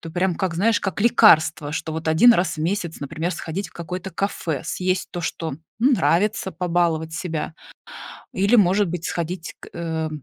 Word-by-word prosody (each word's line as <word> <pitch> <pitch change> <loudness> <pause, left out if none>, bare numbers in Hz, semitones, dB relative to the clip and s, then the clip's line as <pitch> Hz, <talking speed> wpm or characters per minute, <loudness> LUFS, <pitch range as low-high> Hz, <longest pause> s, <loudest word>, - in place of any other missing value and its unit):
это 165 - -8
прям 180 0 +1
как, 185 -3 -1
знаешь, 205 +4 +2
как 195 0 -3
лекарство, 160 -10 +4
что 160 0 -3
вот 160 0 -5
1 170 +10 +7
раз 175 -1 0
в - - -6
месяц, 170 0 -2
например, 160 +5 -3
сходить 170 +3 -5
в - - -23
какое-то 180 +3 -6
кафе, 170 -5 -2
съесть 185 +2 -1
то, 175 - -5
что, 160 -2 -3 0.3
ну, 265 +4 +4
нравится, 195 0 +1
побаловать 170 -3 0
себя. 160 -2 -4 0.8
Или, 200 +5 +3
может 195 0 +4
быть, 175 0 -4
сходить 170 0 -4
к, - - -12
э, 160 -2 -3
175 Hz, 175 wpm, -22 LUFS, 160-190 Hz, 0.8 s, 1